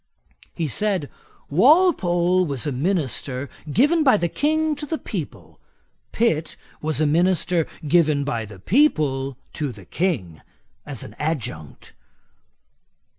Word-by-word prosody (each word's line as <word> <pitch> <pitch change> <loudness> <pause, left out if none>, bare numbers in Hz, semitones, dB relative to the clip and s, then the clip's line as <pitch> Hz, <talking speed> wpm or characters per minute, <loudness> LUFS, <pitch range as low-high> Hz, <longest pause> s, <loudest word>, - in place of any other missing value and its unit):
He 165 - -1
said, 185 - -1 0.4
'Walpole 185 - +4
was 140 -4 -3
a 145 - -1
minister 140 -3 -2 0.2
given 295 - +3
by 260 -7 +5
the 170 -3 -1
King 310 - +1
to 295 0 -6
the 320 - -2
people: - - -7 0.5
Pitt 165 -9 0 0.3
was 155 0 -1
a 155 - +3
minister 170 +1 +2 0.2
given 155 -3 +3
by 120 -6 -2
the 105 -1 -12
people 140 - +1 0.2
to 145 -3 -3
the 100 -5 -13
King, 105 - -2 0.5
as 140 -6 -5
an 105 - -11
adjunct.' 115 - -4
160 Hz, 125 wpm, -22 LUFS, 135-200 Hz, 0.5 s, by